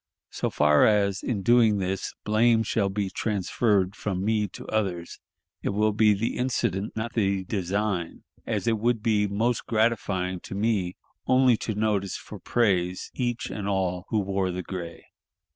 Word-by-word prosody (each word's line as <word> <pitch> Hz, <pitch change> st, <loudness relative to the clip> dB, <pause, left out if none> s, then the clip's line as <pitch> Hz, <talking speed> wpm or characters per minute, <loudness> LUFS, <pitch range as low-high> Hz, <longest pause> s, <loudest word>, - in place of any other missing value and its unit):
So -, -, -2 dB
far 75 Hz, 0 st, +4 dB
as, 100 Hz, -2 st, +2 dB
in 105 Hz, -6 st, -2 dB
doing 115 Hz, -1 st, +5 dB
this, 95 Hz, 0 st, -3 dB
blame 115 Hz, +1 st, +3 dB
shall 100 Hz, -2 st, 0 dB
be 100 Hz, -1 st, -2 dB
transferred 100 Hz, -1 st, 0 dB
from 95 Hz, -2 st, -3 dB
me 105 Hz, -1 st, +1 dB
to -, -, -11 dB
others, 95 Hz, -6 st, -2 dB, 0.4 s
it -, -, -1 dB
will 105 Hz, +2 st, +2 dB
be 105 Hz, -1 st, +4 dB
the 115 Hz, +4 st, -2 dB
incident, 105 Hz, -6 st, -1 dB
not 110 Hz, +1 st, -3 dB
the 100 Hz, -3 st, +1 dB
design, 95 Hz, -2 st, -2 dB, 0.2 s
as -, -, -1 dB
it 115 Hz, -2 st, +2 dB
would 115 Hz, -1 st, 0 dB
be 105 Hz, -3 st, +2 dB
most 110 Hz, +4 st, -1 dB
gratifying 105 Hz, -5 st, 0 dB
to 95 Hz, -, -8 dB
me 100 Hz, -4 st, 0 dB, 0.3 s
only 130 Hz, -1 st, +5 dB
to 110 Hz, -1 st, -4 dB
notice 105 Hz, -3 st, 0 dB
for -, -, -10 dB
praise 90 Hz, -6 st, 0 dB
each 120 Hz, -3 st, -2 dB
and 100 Hz, -2 st, -4 dB
all 95 Hz, -2 st, -1 dB
who 110 Hz, -, 0 dB
wore 95 Hz, -2 st, 0 dB
the 90 Hz, 0 st, -4 dB
gray. 85 Hz, -2 st, -7 dB
105 Hz, 160 wpm, -26 LUFS, 95-110 Hz, 0.4 s, doing